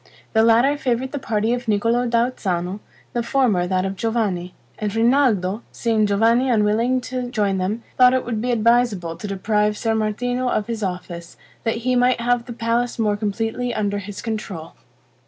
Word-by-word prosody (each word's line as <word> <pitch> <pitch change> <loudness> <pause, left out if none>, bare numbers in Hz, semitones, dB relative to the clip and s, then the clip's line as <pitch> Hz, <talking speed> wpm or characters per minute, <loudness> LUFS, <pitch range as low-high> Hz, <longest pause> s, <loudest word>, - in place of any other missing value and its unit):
The 220 - +4
latter 235 +6 +4
favored 255 0 -1
the 285 - -3
party 225 -2 0
of 245 0 -4
Niccolo 230 +4 +1
da 235 +1 +2
Uzzano, 185 -3 -3 0.3
the 240 - 0
former 230 -8 +1
that 185 0 0
of 195 0 -3
Giovanni; 195 -5 -2 0.2
and 210 -1 -2
Rinaldo, 225 -5 +2
seeing 220 -3 +1
Giovanni 230 +5 +3
unwilling 230 +3 +2
to 250 0 -4
join 205 -5 0
them, 210 +5 -2 0.2
thought 250 0 +7
it 260 - -1
would 225 -3 -2
be 250 - -2
advisable 230 -7 +2
to 210 - -7
deprive 210 +2 0
Ser 225 0 0
Martino 245 +4 -1
of 215 - 0
his 230 -1 -4
office, 180 -3 -5 0.3
that 225 - 0
he 255 0 +2
might 250 0 +3
have 240 0 +1
the - - -8
palace 235 +1 -1
more 210 -3 +1
completely 225 +4 -2
under 205 -1 -1
his 205 0 -8
control. 205 -8 -5
225 Hz, 175 wpm, -21 LUFS, 205-245 Hz, 0.3 s, thought